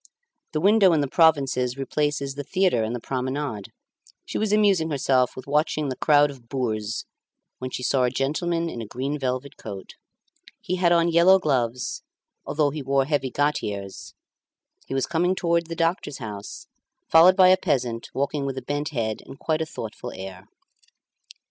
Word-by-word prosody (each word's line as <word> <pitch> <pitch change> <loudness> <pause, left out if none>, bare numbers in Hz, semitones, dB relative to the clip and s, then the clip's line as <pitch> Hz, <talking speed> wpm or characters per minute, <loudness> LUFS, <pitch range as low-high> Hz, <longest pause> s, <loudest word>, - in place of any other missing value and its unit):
The 155 - 0
window 200 0 +5
in 155 - +2
the 140 - 0
provinces 135 -5 +2
replaces 140 0 -1
the 145 +1 -6
theatre 185 -6 +1
and 110 +2 -2
the - - -4
promenade, 130 -3 -4 0.5
she - - -4
was 215 -1 0
amusing 200 -6 +3
herself 130 -3 +1
with 130 - -8
watching 150 0 0
the 130 - -3
crowd 145 0 +4
of 125 -4 -16
boors 110 -5 -2 0.5
when 130 - -4
she 125 - -5
saw 130 0 +2
a - - +2
gentleman 165 +6 -1
in 120 -8 -5
a 110 - -7
green 135 +6 -3
velvet 130 +1 -3
coat. 100 -3 -8 0.7
He 185 - -3
had 175 -1 +3
on 170 0 +4
yellow 175 +3 +6
gloves, 125 -7 -1 0.5
although 145 0 +1
he 150 +1 -5
wore 135 0 +1
heavy 140 -2 0
gaiters; 105 -10 -3 0.7
he 135 - -4
was 135 - +1
coming 175 +3 +1
towards 170 -2 0
the 165 - -4
doctor's 165 -3 -1
house, 105 -4 -8 0.4
followed 170 +3 +7
by 185 -1 +7
a 185 - +7
peasant 130 -10 -2
walking 140 +1 -2
with 135 -1 -3
a - - -5
bent 145 +1 -2
head 110 -6 -3
and 135 - -10
quite 160 -1 -1
a 160 - -2
thoughtful 110 -7 -7
air. 95 0 -9
140 Hz, 175 wpm, -24 LUFS, 125-165 Hz, 0.7 s, followed